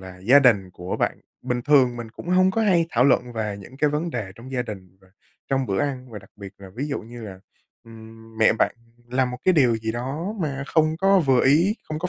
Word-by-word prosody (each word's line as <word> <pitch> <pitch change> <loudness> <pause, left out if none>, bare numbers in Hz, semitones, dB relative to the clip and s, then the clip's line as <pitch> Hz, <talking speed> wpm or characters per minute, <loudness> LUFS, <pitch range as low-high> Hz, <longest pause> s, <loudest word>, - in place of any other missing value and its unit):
là 95 -1 -11
gia 120 +10 +5
đình 105 -9 +3
của 90 0 -5
bạn - - -1 0.2
bình 120 -1 -2
thường 130 -4 +4
mình 115 -2 -7
cũng 170 - -11
hông 185 +1 +4
có 225 +4 0
hay 175 -5 +3
thảo 125 +2 +3
luận 125 -2 +2
về 105 -3 -3
những 125 +7 -13
cái 150 +1 +2
vấn 160 +3 -2
đề 105 -8 -5
trong 125 +4 -12
gia 125 -2 0
đình 95 -5 -10
và 95 - -23 0.4
trong 135 -2 0
bữa 95 -1 -1
ăn 130 -3 -3
và 105 - -7
đặc 95 +2 -18
biệt 100 -1 -10
là, 95 -1 -11
ví 140 +5 -4
dụ 140 - -3
như 120 +1 -11
là, 95 -3 -9 0.4
ừm, 115 0 -14
mẹ 110 - +5
bạn - - +2 0.3
làm 125 0 0
một 125 - -6
cái 185 - +4
điều 125 -6 +4
gì 110 0 -4
đó 145 - -4
mà 140 -3 -3
không 160 0 +1
có 195 +2 +4
vừa 135 -6 +2
ý, 170 +10 +3
không 155 0 -3
có 180 - -3
125 Hz, 250 wpm, -23 LUFS, 110-150 Hz, 0.4 s, gia